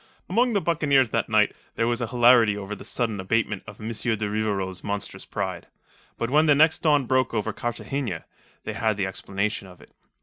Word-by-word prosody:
Among 235 Hz, +6 st, +2 dB
the 200 Hz, -, +2 dB
buccaneers 140 Hz, -8 st, +2 dB
that -, -, 0 dB
night -, -, +3 dB, 0.2 s
there 115 Hz, -, +1 dB
was 120 Hz, 0 st, 0 dB
hilarity 120 Hz, -3 st, +4 dB
over 100 Hz, +1 st, -5 dB
the -, -, -11 dB
sudden 115 Hz, -5 st, -1 dB
abatement 105 Hz, +1 st, 0 dB
of 105 Hz, -1 st, -11 dB
M. 110 Hz, -, -5 dB
de 110 Hz, -2 st, -1 dB
Rivarol's 100 Hz, -3 st, -2 dB
monstrous 100 Hz, -1 st, -4 dB
pride. -, -, -4 dB, 0.5 s
But 115 Hz, +1 st, -2 dB
when 155 Hz, +2 st, +4 dB
the 145 Hz, -, +6 dB
next 160 Hz, +2 st, +4 dB
dawn 145 Hz, -4 st, +3 dB
broke 130 Hz, -1 st, +1 dB
over 110 Hz, 0 st, -1 dB
Cartagena, 120 Hz, -, -4 dB, 0.4 s
they -, -, -4 dB
had 110 Hz, -2 st, 0 dB
the 95 Hz, -, 0 dB
explanation 100 Hz, +2 st, -3 dB
of 90 Hz, -1 st, -15 dB
it. -, -, -18 dB
115 Hz, 190 wpm, -25 LUFS, 105-130 Hz, 0.5 s, the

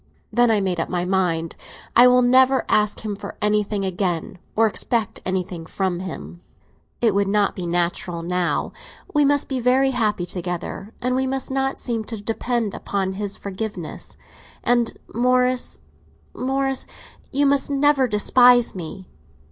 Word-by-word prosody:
Then 240 Hz, 0 st, +4 dB
I 215 Hz, -2 st, +3 dB
made 185 Hz, -3 st, -1 dB
up 165 Hz, -, -2 dB
my 180 Hz, -1 st, -1 dB
mind. 175 Hz, -3 st, 0 dB, 0.4 s
I 245 Hz, +2 st, +8 dB
will 250 Hz, 0 st, +5 dB
never 260 Hz, +1 st, +4 dB
ask 210 Hz, 0 st, +1 dB
him 210 Hz, -2 st, -3 dB
for -, -, -8 dB
anything 210 Hz, -1 st, 0 dB
again, 180 Hz, 0 st, -2 dB, 0.2 s
or 225 Hz, -, +4 dB
expect 225 Hz, 0 st, -1 dB
anything 180 Hz, -3 st, -3 dB
from 185 Hz, -1 st, -1 dB
him. 180 Hz, -1 st, -7 dB, 0.6 s
It 225 Hz, -4 st, +3 dB
would 200 Hz, 0 st, +1 dB
not 205 Hz, 0 st, +1 dB
be 180 Hz, -3 st, -4 dB
natural 175 Hz, 0 st, -1 dB
now. 180 Hz, 0 st, -1 dB, 0.4 s
We 295 Hz, -1 st, +4 dB
must 285 Hz, 0 st, +2 dB
be 265 Hz, -2 st, -2 dB
very 260 Hz, +2 st, +3 dB
happy 210 Hz, -7 st, 0 dB
together, 180 Hz, +3 st, -4 dB
and 250 Hz, 0 st, +1 dB
we 265 Hz, 0 st, 0 dB
must 265 Hz, 0 st, -3 dB
not 270 Hz, 0 st, 0 dB
seem 230 Hz, -3 st, -2 dB
to 225 Hz, -1 st, -5 dB
depend 225 Hz, +1 st, -2 dB
upon 190 Hz, -1 st, -2 dB
his 200 Hz, 0 st, -4 dB
forgiveness. 200 Hz, -4 st, -6 dB, 0.5 s
And 240 Hz, -1 st, +1 dB, 0.2 s
Morris, 250 Hz, +1 st, +1 dB, 0.5 s
Morris, 270 Hz, +1 st, -1 dB, 0.4 s
you 285 Hz, +1 st, +2 dB
must 280 Hz, 0 st, +2 dB
never 280 Hz, -1 st, +3 dB
despise 245 Hz, +3 st, +5 dB
me!" 185 Hz, +1 st, -8 dB
215 Hz, 150 wpm, -22 LUFS, 185-250 Hz, 0.6 s, I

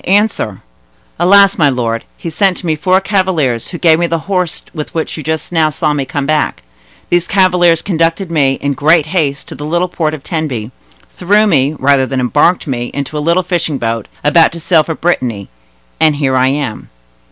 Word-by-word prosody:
Answer!" 195 Hz, -, 0 dB, 0.6 s
"Alas! 200 Hz, +2 st, +5 dB
my 145 Hz, -3 st, +4 dB
lord, 115 Hz, -3 st, -2 dB
he 165 Hz, -, -6 dB
sent 190 Hz, +3 st, +1 dB
to -, -, -6 dB
me 160 Hz, -2 st, +1 dB
four 185 Hz, +5 st, +2 dB
cavaliers, 185 Hz, -, 0 dB
who 175 Hz, -, -7 dB
gave 160 Hz, -1 st, +3 dB
me 170 Hz, -, +1 dB
the 165 Hz, -, -1 dB
horse 180 Hz, -4 st, -1 dB
with 155 Hz, -3 st, -6 dB
which 160 Hz, -, -3 dB
you 155 Hz, -, -6 dB
just 160 Hz, +2 st, -3 dB
now 160 Hz, -2 st, +2 dB
saw 150 Hz, 0 st, -1 dB
me 140 Hz, -2 st, -2 dB
come 140 Hz, +1 st, -3 dB
back. 155 Hz, -, -1 dB, 0.5 s
These 175 Hz, 0 st, +2 dB
cavaliers 180 Hz, -3 st, +3 dB
conducted 165 Hz, 0 st, -1 dB
me, 140 Hz, -5 st, +2 dB
in 140 Hz, 0 st, -1 dB
great 150 Hz, +3 st, +3 dB
haste, 155 Hz, -5 st, -2 dB
to -, -, -7 dB
the -, -, -8 dB
little 175 Hz, +4 st, 0 dB
port 155 Hz, -3 st, -2 dB
of 145 Hz, -, -12 dB
Tenby, 135 Hz, -10 st, -4 dB, 0.4 s
threw 205 Hz, -, +2 dB
me, 150 Hz, -6 st, +1 dB
rather 135 Hz, -1 st, +2 dB
than 135 Hz, 0 st, -2 dB
embarked 145 Hz, +8 st, +2 dB
me, 120 Hz, -4 st, -3 dB
into 140 Hz, +2 st, -4 dB
a -, -, -1 dB
little 170 Hz, +4 st, +1 dB
fishing 170 Hz, -5 st, -1 dB
boat, 115 Hz, -3 st, -3 dB, 0.2 s
about 160 Hz, +3 st, +4 dB
to 170 Hz, -, -7 dB
sail 165 Hz, 0 st, +3 dB
for 160 Hz, -, -4 dB
Brittany, 125 Hz, -, -2 dB, 0.5 s
and 155 Hz, -2 st, +3 dB
here 135 Hz, -3 st, 0 dB
I 130 Hz, 0 st, +3 dB
am." 135 Hz, -4 st, -3 dB
155 Hz, 200 wpm, -14 LUFS, 140-175 Hz, 0.6 s, Alas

